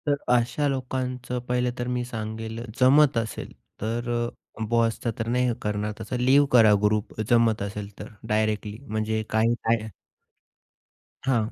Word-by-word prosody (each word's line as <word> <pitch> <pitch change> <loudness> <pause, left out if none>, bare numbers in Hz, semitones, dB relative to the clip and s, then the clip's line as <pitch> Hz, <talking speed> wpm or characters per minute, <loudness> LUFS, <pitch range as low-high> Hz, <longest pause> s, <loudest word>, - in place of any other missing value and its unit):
तर 145 - +4 0.2
अशा 125 +5 +1
लोकांचं 125 -2 -3
पहिलं 125 0 +1
तर 120 - -2
मी 125 0 -1
सांगेल 110 -1 -5 0.2
जमत 135 +1 +5
असेल, 115 -1 -3 0.3
तर 115 +3 -2 0.5
अ, - - -1
बॉसचा 115 0 +1
तर 110 - -2
नाही 125 +1 +1
करणार. 105 0 -2
तसं 110 +3 -4
लीव्ह 135 +3 +5
करा 115 -4 +7
ग्रुप 105 0 0
जमत 115 -3 +3
असेल 100 0 -4
तर - - -6 0.2
डायरेक्टली. 105 -1 0
म्हणजे 110 -1 -1
काही 110 +2 +3
काय 110 -1 +1 1.4
हां. 120 -4 +1
115 Hz, 140 wpm, -25 LUFS, 110-125 Hz, 1.4 s, करा